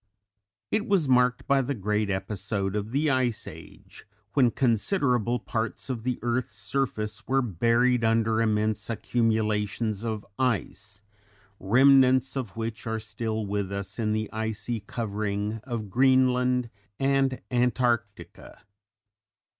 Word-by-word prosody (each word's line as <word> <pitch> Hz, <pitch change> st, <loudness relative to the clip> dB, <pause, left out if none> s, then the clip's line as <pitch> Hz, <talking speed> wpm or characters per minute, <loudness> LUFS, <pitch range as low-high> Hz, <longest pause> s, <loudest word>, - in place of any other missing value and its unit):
It 215 Hz, 0 st, 0 dB
was 190 Hz, -7 st, +2 dB
marked 125 Hz, -1 st, +3 dB
by 140 Hz, -1 st, +3 dB
the 135 Hz, +2 st, -2 dB
great 105 Hz, 0 st, -1 dB
episode 95 Hz, +1 st, -2 dB
of 105 Hz, 0 st, -2 dB
the 145 Hz, +3 st, +1 dB
Ice 125 Hz, -4 st, 0 dB
Age, -, -, -12 dB, 0.3 s
when 130 Hz, -4 st, +4 dB
considerable 125 Hz, -, +1 dB
parts 115 Hz, +3 st, -3 dB
of 120 Hz, -3 st, -4 dB
the 125 Hz, +1 st, -2 dB
earth's 120 Hz, -2 st, -1 dB
surface 110 Hz, -3 st, -3 dB
were 135 Hz, +1 st, +2 dB
buried 115 Hz, +4 st, +2 dB
under 115 Hz, 0 st, +2 dB
immense 110 Hz, 0 st, 0 dB
accumulations 110 Hz, -2 st, 0 dB
of 110 Hz, -3 st, -3 dB
ice, 105 Hz, -4 st, -2 dB, 0.6 s
remnants 130 Hz, +4 st, +4 dB
of 115 Hz, -7 st, -4 dB
which 115 Hz, -1 st, -4 dB
are 110 Hz, 0 st, -1 dB
still 110 Hz, 0 st, -4 dB
with 100 Hz, -1 st, -2 dB
us 100 Hz, +3 st, -5 dB
in 110 Hz, -2 st, 0 dB
the 110 Hz, 0 st, -1 dB
icy 110 Hz, +1 st, -3 dB
covering 105 Hz, 0 st, -3 dB
of 115 Hz, -6 st, -5 dB
Greenland 125 Hz, -1 st, +3 dB, 0.3 s
and 135 Hz, -1 st, +1 dB
Antarctica. 120 Hz, -3 st, -1 dB
115 Hz, 120 wpm, -27 LUFS, 105-125 Hz, 0.6 s, when